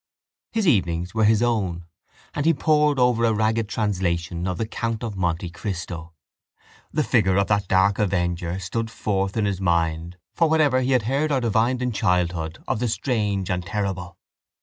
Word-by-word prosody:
His 220 -4 0
evenings 90 - +1
were 110 -1 +2
his 110 +1 +4
own; 95 -8 -1 0.5
and 145 +1 -1
he 165 - +4
pored 150 -1 +2
over 125 -2 +3
a 115 -1 +3
ragged 110 0 0
translation 90 -5 -1
of 90 -1 -2
The 110 - -1
Count 115 0 -3
of 110 -3 -4
Monte 85 -1 -1
Cristo. 85 -2 -6 0.8
The 155 - +1
figure 95 -9 +2
of 100 - +3
that 100 -2 +1
dark 95 +1 +3
avenger 90 -3 -1
stood 110 +5 -3
forth 100 -2 -2
in 110 - +1
his 100 -2 -2
mind 85 -1 0 0.2
for 165 -2 +2
whatever 150 -5 +3
he 130 +1 +1
had 125 -4 +3
heard 140 +7 0
or 135 - +2
divined 120 +2 +1
in 125 - 0
childhood 90 -5 -1
of - - -1
the 125 - 0
strange 105 -6 -1
and 90 -1 -1
terrible. 95 -3 -4
100 Hz, 175 wpm, -23 LUFS, 90-120 Hz, 0.8 s, his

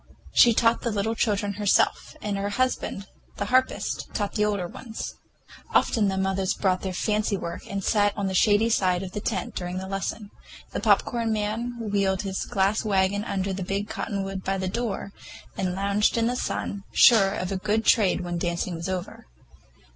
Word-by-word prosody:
She 235 -2 +6
taught 230 0 +3
the 235 - -1
little 215 +1 -1
children 205 -2 0
herself, 205 - +2
and 205 -1 -1
her 200 +1 -2
husband, 230 -3 -1 0.3
the 200 - -2
harpist, 255 +4 0
taught 205 -2 -1
the 210 - +1
older 200 -4 0
ones. 225 +4 -7 0.6
Often 220 -4 +3
the 190 0 -1
mothers 190 0 0
brought 185 -2 +1
their 190 - -3
fancy 210 +2 0
work 170 -2 -6
and 195 -1 -3
sat 205 -1 +2
on 200 - -1
the 190 - -1
shady 205 +3 +4
side 185 -3 +2
of 185 - -6
the 210 - -4
tent - - -2
during 180 0 -4
the 190 - -4
lesson. 195 +2 -4 0.4
The - - -3
popcorn 230 -2 +2
man 220 +3 -2
wheeled 200 -3 0
his 190 -1 -3
glass 200 +2 +1
wagon 200 -1 +1
under 195 -2 -2
the 190 - -4
big 195 +3 -2
cottonwood 195 -2 -3
by 195 0 -1
the 190 0 -2
door, 205 -1 -3 0.4
and 185 -1 -2
lounged 200 +3 +1
in 230 - +2
the 245 +2 0
sun, 200 -5 -3
sure 205 -5 +6
of 185 +1 -3
a 195 - -1
good 215 +3 0
trade 200 -4 +4
when 175 -1 -3
the 175 - -1
dancing 175 +1 -2
was 170 +2 -4
over. 180 - -5
200 Hz, 190 wpm, -25 LUFS, 190-215 Hz, 0.6 s, She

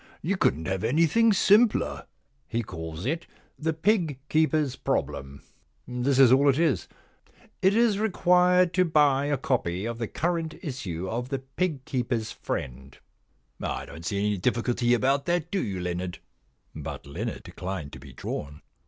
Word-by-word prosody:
You 190 +5 +1
couldn*t 80 - +1
have 95 -1 -2
anything 165 - +4
simpler. 210 +3 +3 0.4
He 115 +7 -1
calls 80 -2 -7
it 160 +6 -2 0.2
" - - -37
The 160 +1 0
Pig 160 - +1
Keeper's 155 -4 +2
Problem.*' 70 - -3 0.4
This 125 +2 0
is 135 -3 +7
all 140 +2 +5
it 135 - +3
is: 160 -4 +1 0.4
" - - -30 0.3
It 190 +2 +4
is 225 -3 +3
required 180 -3 +3
to 185 +1 +4
buy 145 -5 +3
a 145 -1 +1
copy 105 -8 -1
of 115 0 -4
the 115 - -2
current 165 +2 -2
issue 95 - -4
of 120 +5 -3
The 135 - -1
Pig 135 +1 -3
Keepers^ 120 -4 -2
Friend 65 0 -5 0.6
^ - - -7
I - - -3
don't 80 - -10
see 100 +3 -2
any 105 0 0
difficulty 120 +3 +1
about 135 +3 +1
that, 170 -1 0
do 195 - 0
you, 95 -3 -3
Leonard 90 0 -3 0.2
} - - -42
* - - -42
But 75 -2 -6
Leonard 70 - -5
declined 90 -6 -6
to - - -8
be 70 0 -12
drawn. 75 +3 -6
130 Hz, 170 wpm, -27 LUFS, -, 0.6 s, is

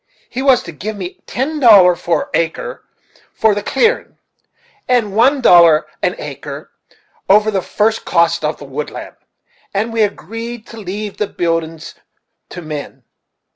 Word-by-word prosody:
He 255 - -3
was 265 -2 +4
to 170 - -8
give 210 +8 -6
me 185 -2 -7
ten 300 +5 -2
dollar 200 -8 +7
an 175 +8 -1
acre 170 - -2 0.5
for 220 -1 +3
the 205 - -2
clearin', 460 - 0 0.7
and 230 -6 +1
one 265 +5 +4
dollar 170 -8 +6 0.2
an - - 0
acre - - -8 0.6
over 210 +2 +5
the 195 -2 0
first 220 +4 0
cost 170 -1 +1
on 150 +1 -1
the 145 - -11
woodland, 140 +2 -6 0.6
and 220 +3 -1
we 225 - +1
agreed 225 +3 -4
to 230 - -12
leave 205 0 -6
the 210 - -1
buildin's 165 -2 -3 0.6
to 180 - -8
men. 145 -4 -7
205 Hz, 145 wpm, -16 LUFS, 170-230 Hz, 0.7 s, dollar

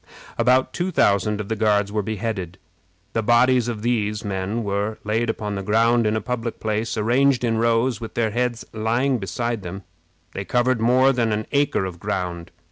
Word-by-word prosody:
] - - -18
About 125 +2 +3
two 180 +1 -1
thousand 105 - +2
of 105 - -4
the 110 - -1
Guards 105 -2 +1
were 105 0 0
beheaded. 100 -4 -4 0.6
The 115 - +1
bodies 120 +2 +3
of 110 -3 -4
these 105 -3 -1
men 100 +3 -2
were 100 +1 -2
laid 110 +2 0
upon 105 -2 -3
the 100 - -3
ground 115 +3 +3
in 105 - +1
a 110 - -1
public 115 0 -4
place, 110 +1 -2
arranged 125 +4 +2
in 115 -2 +1
rows, 115 +1 +1
with 115 - -7
their 110 -2 +1
heads 120 0 -1
lying 120 +4 0
beside 115 +4 -3
them. 95 +2 -7 0.5
They 95 - -5
covered 125 +1 +1
more 130 +3 +4
than 115 -3 +1
an 105 0 -1
acre 140 -8 +1
of 90 -2 -7
ground. 90 -3 -3
110 Hz, 190 wpm, -22 LUFS, 105-120 Hz, 0.6 s, more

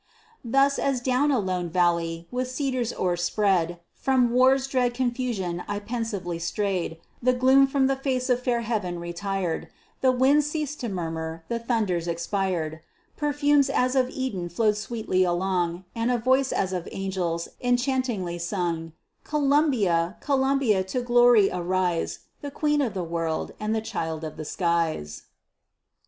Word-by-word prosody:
Thus, 275 +4 +3
as 275 -2 +1
down 255 +3 +1
a 275 - +3
lone 185 -4 -1
valley, 170 -1 0
with 250 0 -2
cedars 255 -3 -1
o'er 180 -1 0
spread, 175 -1 +1
From 255 -3 +2
war's 260 +2 +4
dread 250 -3 0
confusion 240 -9 -2
I 205 - -2
pensively 205 -6 -3
strayed, 180 -2 -2 0.2
The 255 +1 +3
gloom 260 +2 +5
from 270 0 +2
the 270 0 +2
face 260 -2 -1
of 250 -1 +2
fair 240 -2 0
heaven 210 -6 -2
retired; 175 0 -3 0.3
The 260 - +5
winds 275 +4 +3
ceased 300 -1 -3
to 240 - -3
murmur; 165 -3 -4
the 235 - -1
thunders 215 -8 -1
expired; 170 -2 -2 0.4
Perfumes 290 -1 +2
as 255 -1 +1
of 255 -1 +3
Eden 200 -10 -3
flowed 210 +4 +2
sweetly 215 -4 0
along, 175 0 0
And 230 +1 -1
a 250 - +2
voice 260 +3 +2
as 190 -1 0
of 180 -2 -4
angels, 180 -3 -2
enchantingly 245 -8 0
sung: 170 -3 -2 0.3
"Columbia, 270 - +2
Columbia, 270 -7 +2
to 245 +7 -2
glory 240 -4 +5
arise, 180 -1 -1 0.2
The 285 - -5
queen 295 +1 +1
of 230 -7 -1
the 185 - -2
world, 165 -1 -2
and 215 +1 -1
the 220 - 0
child 160 -6 -4
of 155 - -5
the 155 - -7
skies." 165 - -1
215 Hz, 150 wpm, -25 LUFS, 175-255 Hz, 0.4 s, gloom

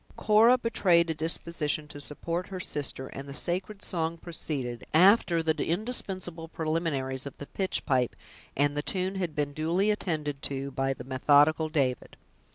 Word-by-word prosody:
Cora 225 +4 +5
betrayed 185 -8 +2
a - - 0
disposition 155 -1 -1
to 145 - -7
support 170 +5 -2
her 190 -2 -6
sister, 145 -6 -3
and 140 +1 -8
the 140 - -6
sacred 185 +5 -2
song 165 -2 -1
proceeded, 140 -8 -5
after 175 -2 +5
the 160 -1 +1
indispensable 185 -4 -3
preliminaries 155 -5 -2
of 140 - -9
the 145 - -7
pitchpipe, 135 -9 0 0.4
and 145 +1 +2
the 145 - 0
tune 185 +4 0
had 175 -5 -3
been 145 -1 -1
duly 170 +7 +1
attended 150 -8 -2
to 140 0 -3
by 135 0 -1
the - - -8
methodical 145 +4 +3
David. 135 -6 -1
160 Hz, 155 wpm, -28 LUFS, 145-180 Hz, 0.4 s, Cora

